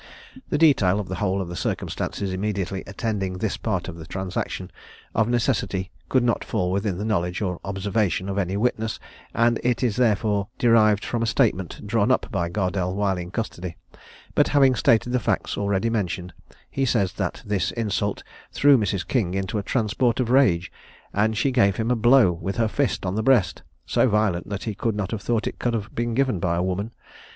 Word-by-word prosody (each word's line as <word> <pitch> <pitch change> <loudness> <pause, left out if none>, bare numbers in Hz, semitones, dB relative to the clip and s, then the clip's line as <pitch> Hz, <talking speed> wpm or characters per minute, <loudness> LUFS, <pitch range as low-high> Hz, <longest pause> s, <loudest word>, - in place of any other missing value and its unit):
The - - +1
detail 110 - +4
of 100 - -5
the 95 - -3
whole 95 -1 +1
of 95 - -4
the 85 - -6
circumstances 95 +2 -3
immediately 95 -1 -2
attending 100 -3 -3
this 100 +2 -1
part 95 -6 -2
of 90 -2 -7
the 80 -1 -10
transaction 95 +2 -4 0.4
of 115 +1 +2
necessity 115 -6 0 0.2
could 130 -2 +3
not 120 -1 +1
fall 90 0 -1
within 100 -1 -1
the 105 - -3
knowledge 90 -4 0
or 90 -4 -2
observation 100 -1 -1
of 100 0 -1
any 95 0 -1
witness, 110 0 -1 0.4
and 115 0 +3
it 125 +1 +1
is 115 -5 +1
therefore 105 -4 +2
derived 110 -3 +4
from 120 - -2
a 115 - 0
statement 95 -3 0
drawn 110 +1 +1
up 130 - +1
by 85 -4 -1
Gardelle 90 -1 -1
while 100 -2 0
in 90 0 -6
custody; 90 -4 -4 0.6
but - - +3
having 135 -3 +4
stated 115 +1 +2
the 125 - +2
facts 110 - -1
already 100 +2 0
mentioned, 90 -4 -2 0.4
he 135 - -1
says 115 -7 +1
that - - -3
this 100 -4 0
insult 105 -3 -2 0.3
threw 145 -2 +5
Mrs. 100 -3 -1
King 100 -8 0
into 95 +2 -2
a - - -1
transport 115 +3 0
of 120 -2 0
rage, 95 -10 +3 0.4
and 110 +2 +1
she 135 - +2
gave 105 -6 +3
him 115 +2 -1
a - - +3
blow 120 -3 +5
with 85 +3 -4
her 115 -1 +2
fist 135 -2 -1
on 90 - -1
the 110 - 0
breast, 110 -8 +3 0.2
so 130 - +2
violent 105 -5 +1
that 100 -1 -4
he 110 - -3
could 110 +2 -2
not 105 -2 -3
have 110 -3 -3
thought 115 +3 0
it - - -4
could 120 -1 0
have 105 -2 -4
been 120 0 -2
given 130 -7 +1
by 85 0 0
a 85 - 0
woman. 95 +4 -2
105 Hz, 200 wpm, -24 LUFS, 95-115 Hz, 0.6 s, threw